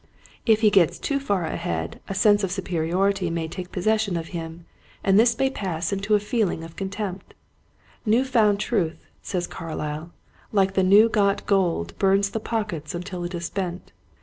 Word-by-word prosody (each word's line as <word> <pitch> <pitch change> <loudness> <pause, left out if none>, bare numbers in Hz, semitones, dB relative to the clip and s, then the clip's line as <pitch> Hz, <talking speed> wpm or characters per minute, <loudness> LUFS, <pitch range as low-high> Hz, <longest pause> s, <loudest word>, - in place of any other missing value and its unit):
If 220 -1 +4
he 215 -2 +5
gets 175 -4 +4
too 280 -1 -1
far 200 -10 -1
ahead 80 - -3
a 195 - -3
sense 205 +1 +4
of 190 - -1
superiority 185 +1 0
may 165 -1 -2
take 180 +2 -7
possession 215 0 +1
of 165 0 -5
him, 165 -1 -7 0.4
and 195 +1 +5
this 230 0 +4
may 270 0 +2
pass 175 -5 -2
into 200 +2 +1
a - - +3
feeUng 205 -6 -1
of 165 - -12
contempt. 195 -1 -5 0.7
New 230 +4 +3
found 215 -6 +3
truth 205 -7 -1
— - - -37
says 180 -2 -2
Carlyle 155 0 -5 0.2
— - - -30
like 195 -2 +2
new 195 +4 +6
got 200 -2 +1
gold 175 - +1
burns 200 +1 +3
the 225 - -2
pockets 210 -9 -3
until 180 0 -5
it 175 +1 -5
is 170 0 -4
spent. 180 -1 -4
195 Hz, 175 wpm, -24 LUFS, 170-210 Hz, 0.7 s, new